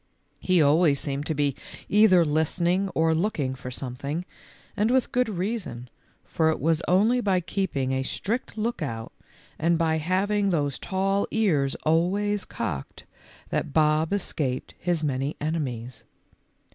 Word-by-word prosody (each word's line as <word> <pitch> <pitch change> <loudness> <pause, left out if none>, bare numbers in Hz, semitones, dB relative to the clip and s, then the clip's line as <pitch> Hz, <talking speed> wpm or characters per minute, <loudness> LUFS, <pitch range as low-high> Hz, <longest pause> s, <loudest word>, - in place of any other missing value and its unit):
He 180 -4 +3
always 145 0 +4
seemed 140 0 -3
to 160 - -1
be 140 -2 +1 0.3
either 195 -5 +5
listening 170 +5 +1
or 160 0 +3
looking 160 -6 0
for 125 -1 -8
something, 140 +6 -4 0.5
and 210 +2 +1
with 260 0 +2
good 250 -2 +1
reason, 180 - -4 0.3
for 160 -1 +1
it 160 - 0
was 165 0 +1
only 215 +7 +3
by 195 -4 +2
keeping 175 -7 -2
a 130 0 0
strict 220 - -3
lookout, 155 - -3 0.5
and 170 +2 +2
by 160 -1 +1
having 200 +5 +1
those 145 -6 0
tall 195 +1 0
ears 155 -12 +1
always 195 +6 +1
cocked, 70 - -5 0.4
that - - -2
Bob 155 +1 +3
escaped 145 -10 -2
his 175 -3 -1
many 140 0 -1
enemies. 130 -7 -3
165 Hz, 135 wpm, -26 LUFS, 140-195 Hz, 0.5 s, either